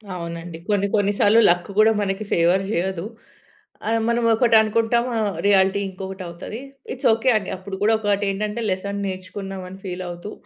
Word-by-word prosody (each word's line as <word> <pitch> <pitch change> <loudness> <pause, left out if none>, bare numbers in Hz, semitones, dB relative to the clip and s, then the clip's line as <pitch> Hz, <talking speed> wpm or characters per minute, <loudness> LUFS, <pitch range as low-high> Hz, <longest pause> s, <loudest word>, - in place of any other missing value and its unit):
అవునండి. 170 -1 -6
కొన్ని, 200 -1 +2
కొన్నిసార్లు 205 +1 +3
లక్ 175 +2 +1
కూడా 220 +1 +6
మనకి 195 +1 -2
ఫేవర్ 175 +3 +3
జేయదు. 190 -2 -1 0.8
ఆ! - - +1 0.2
మనం 235 0 +1
ఒకటి 230 0 +3
అనుకుంటాం. 225 +2 +1
ఆహ్, 210 -3 -1
రియాలిటీ 195 0 +4
ఇంకొకటి 190 0 -7
అవుతది. 175 +7 -7 0.3
ఇట్స్ 255 - 0
ఓకే 225 +4 +1
అండి. 200 -3 -5
అప్పుడు 190 +1 -7
కూడా 220 +2 +4
ఒకటి 205 -1 0
ఏంటంటే, 210 +3 -3
లెసన్ 200 +2 -2
నేర్చుకున్నాం 190 0 -6
అని 190 +1 -11
ఫీల్ 185 0 -4
అవుతూ 175 +4 -7
195 Hz, 160 wpm, -22 LUFS, 185-215 Hz, 0.8 s, కూడా